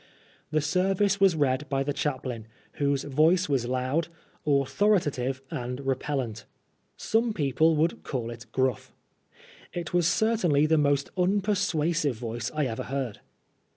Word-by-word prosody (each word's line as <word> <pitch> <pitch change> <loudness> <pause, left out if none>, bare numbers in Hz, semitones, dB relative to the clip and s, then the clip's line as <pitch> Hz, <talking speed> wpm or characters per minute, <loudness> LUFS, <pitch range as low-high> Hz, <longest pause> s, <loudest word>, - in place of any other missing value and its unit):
The 155 0 +1
service 195 +6 +1
was 190 -3 +5
read 140 -1 0
by 135 -1 0
the 145 +1 -2
chaplain, 130 -6 -3 0.3
whose 140 -1 +1
voice 160 +6 +3
was 135 -5 0
loud, 130 +6 0 0.4
authoritative, 140 -3 +1
and 125 +1 -4
repellant. 130 -5 -2 0.5
Some 225 0 +1
people 155 0 +2
would 160 +2 +1
call 120 -4 -4
it 120 +2 -10
gruff. 130 -1 -1 0.8
It 175 -2 -5
was 175 -2 +3
certainly 180 -9 +2
the 160 0 +3
most 140 -1 +1
unpersuasive 180 -6 +1
voice 115 0 -4
I 150 -1 +1
ever 115 -3 -3
heard. 130 -5 -3
145 Hz, 130 wpm, -27 LUFS, 130-170 Hz, 0.8 s, was